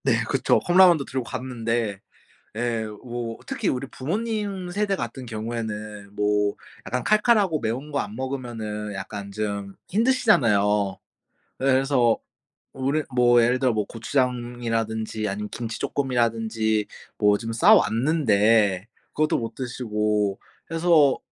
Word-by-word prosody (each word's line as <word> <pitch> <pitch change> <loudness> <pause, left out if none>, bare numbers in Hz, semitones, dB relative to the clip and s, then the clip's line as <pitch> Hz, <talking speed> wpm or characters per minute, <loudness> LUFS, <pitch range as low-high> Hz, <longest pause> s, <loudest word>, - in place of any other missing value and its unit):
네 - - +2
그쵸. - - +2
컵라면도 175 -5 +5
들고 130 -1 -3
갔는데 115 -4 -3 0.6
예 115 -1 -1 0.2
뭐 120 -2 -5
특히 270 -7 -2
우리 130 +1 -1
부모님 200 - -3
세대 200 +2 0
같은 125 -4 -5
경우에는 110 -3 -5
뭐 105 0 +1 0.3
약간 125 0 -2
칼칼하고 210 - +3
매운 125 +6 -3
거 145 - -1
안 105 -2 -4
먹으면은 115 -5 -4
약간 100 +1 -6
좀 100 -1 -4 0.2
힘드시잖아요. 115 - +3 0.6
예 - - 0
그래서 130 -3 +3 0.6
우리 135 +4 0
뭐 120 -1 +5
예를 125 +2 +2
들어 130 -1 +2
뭐 105 -2 0
고추장이라든지 115 -3 -2
아니면 105 +2 -4
김치 115 -1 -5
쪼끔이라든지 115 -4 0 0.3
뭐 105 -1 +4
좀 115 +1 -5
싸왔는데 115 - +3 0.3
그것도 155 0 +1
못 115 -1 -5
드시고 105 -5 -1 0.3
그래서 165 -4 +4
120 Hz, 280 characters per minute, -24 LUFS, 105-140 Hz, 0.6 s, 컵라면도